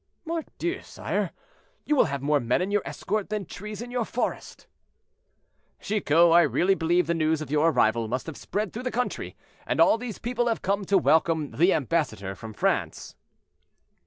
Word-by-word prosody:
"Mordieu! 335 +2 -3
sire, - - -3 0.6
you 300 - +2
will - - +5
have 140 -3 -4
more 145 0 +3
men 120 -1 +1
in 185 +2 -2
your 205 0 +2
escort 210 0 -3
than 210 -2 -3
trees 210 +6 -7
in 245 - -9
your 245 -1 0
forest." 240 +2 -4 1.1
"Chicot, 170 -5 +3
I 170 +1 +7
really 170 - +2
believe 175 0 +1
the 170 - 0
news 160 -1 +1
of 155 -3 -7
your 150 +2 +4
arrival 115 -6 +2
must 125 +3 -3
have 160 - -7
spread 205 +1 -3
through 240 - -5
the 255 - -2
country, 250 0 -3 0.3
and - - -1
all 225 - +5
these 240 -4 -6
people 240 0 -1
have 230 - -1
come 200 +1 0
to 195 +1 +3
welcome 160 -3 +2
the 175 +5 +3
ambassador 135 - -1
from 110 +4 -9
France." - - -1
175 Hz, 180 wpm, -26 LUFS, 150-215 Hz, 1.1 s, I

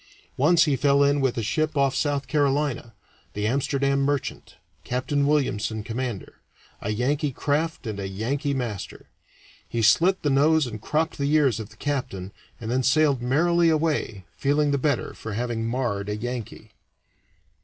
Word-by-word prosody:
Once 165 +5 +4
he 150 -4 +2
fell 140 +1 +3
in 140 0 +2
with 130 -3 0
a 115 - -1
ship 155 +7 -1
off 140 -1 +3
South 145 -2 0
Carolina 140 -5 0 0.4
the 105 0 -2
Amsterdam 140 +3 +1
Merchant, 140 -1 -2 0.3
Captain 140 +3 0
Williamson, 110 -7 0
commander 115 -2 -5 0.4
a 100 - -3
Yankee 140 +7 0
craft 150 +4 -1
and 105 -3 -4
a 95 - -3
Yankee 135 +9 -2
master. 115 -7 -5 0.6
He 115 - -1
slit 170 - +4
the 145 - +2
nose 150 +2 +4
and 110 -4 -7
cropped 160 +6 -1
the 140 +1 0
ears 140 -7 +3
of 110 - -7
the 110 - -18
captain, 125 -10 -3 0.3
and 115 0 -5
then 130 +1 +2
sailed 140 0 +3
merrily 165 +7 +3
away, 150 - 0
feeling 145 +1 +1
the 140 - +1
better 145 -2 0
for 110 - -7
having 115 0 -2
marred 115 -5 -2
a 105 - -1
Yankee. 120 0 -6
135 Hz, 160 wpm, -25 LUFS, 115-145 Hz, 0.6 s, Once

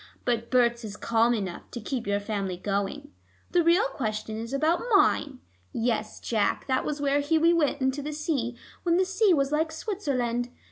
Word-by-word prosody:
But 235 -1 0
Berts 240 -2 +2
is 210 -1 -7
calm 230 +1 +2
enough 190 -5 -5
to 240 - -6
keep 240 0 -4
your 200 0 +1
family 200 -3 -3
going. 205 +10 -3 0.4
The 350 -1 +3
real 345 +7 +4
question 215 -3 -3
is 230 +2 -5
about 310 +5 +1
mine. 285 -9 +2 0.3
Yes, 225 -2 -1
Jack, 215 -3 0
that 260 -1 +1
was 300 -1 -3
where 285 0 +2
Hughie 320 +3 +3
went 295 -4 +1
into 265 +2 0
the 300 +2 -4
sea, 285 -6 -2 0.2
when 340 -1 +2
the 375 - +3
sea 385 +2 +3
was 275 -4 +2
like 315 +1 +1
Switzerland. 265 - -2
260 Hz, 180 wpm, -27 LUFS, 225-310 Hz, 0.4 s, real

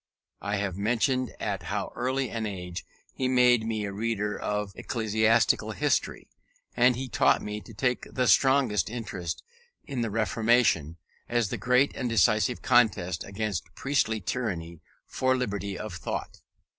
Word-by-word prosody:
I 100 +1 -1
have 100 -3 -2
mentioned 125 +4 +1
at 100 -3 -2
how 100 +3 -3
early 130 0 -1
an 110 -1 -2
age 90 -3 -6 0.3
he 130 - -1
made 125 -3 +4
me 110 -2 -1
a 100 - -5
reader 105 0 -1
of 105 -1 -2
ecclesiastical 110 0 +1
history; 145 +6 0 0.5
and 125 0 +4
he 130 +2 -4
taught - - +3
me 105 0 -4
to - - -13
take 125 +3 -1
the 125 - 0
strongest 130 -5 +3
interest 100 -8 -5 0.4
in 135 -4 -4
the 115 - -1
Reformation, 110 -7 +2 0.3
as 120 -3 +1
the - - -3
great 125 +3 +2
and 125 -2 -2
decisive 110 +2 +2
contest 105 -8 +2
against 100 -5 -4
priestly 130 -6 0
tyranny 90 -6 -4 0.2
for 130 0 +1
liberty 100 -5 -3
of 105 -3 -6
thought. 85 - -5
110 Hz, 145 wpm, -27 LUFS, 100-125 Hz, 0.5 s, made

